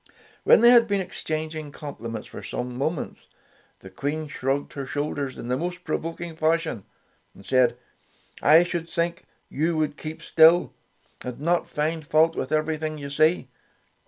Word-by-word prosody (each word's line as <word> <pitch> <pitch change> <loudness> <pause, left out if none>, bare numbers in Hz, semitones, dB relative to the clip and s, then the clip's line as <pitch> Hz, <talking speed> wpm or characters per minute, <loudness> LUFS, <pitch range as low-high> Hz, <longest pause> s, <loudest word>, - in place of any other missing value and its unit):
When - - +7
they 235 +1 +8
had 235 -2 +6
been 200 -2 +1
exchanging 155 -4 -4
com 145 0 -8
pliments 115 -1 -6
for - - -9
some 125 0 -5
moments, 145 +5 -3 0.5
the 95 - -12
Queen 145 +9 -3
shrugged 140 0 -2
her 140 -2 -5
shoulders 145 -2 -3
in - - -7
the 125 - +1
most 180 +5 -4
pro 155 - -1
voking 165 0 -6
fashion, 160 - 0 0.5
and 100 - -15
said, 125 -2 +3 0.6
''I 160 +4 +6
should 170 -1 -4
think 170 0 -2 0.2
you 160 +3 -1
would 155 -1 -1
keep 160 +1 -7
still, 165 +2 +5 0.5
and 125 -1 -6
not 170 +4 +1
find 155 +2 -1
fault 160 +2 +3
with 130 - -3
everything 155 0 -1
you 140 -1 -7
see. 155 0 +2
155 Hz, 160 wpm, -25 LUFS, 140-165 Hz, 0.6 s, they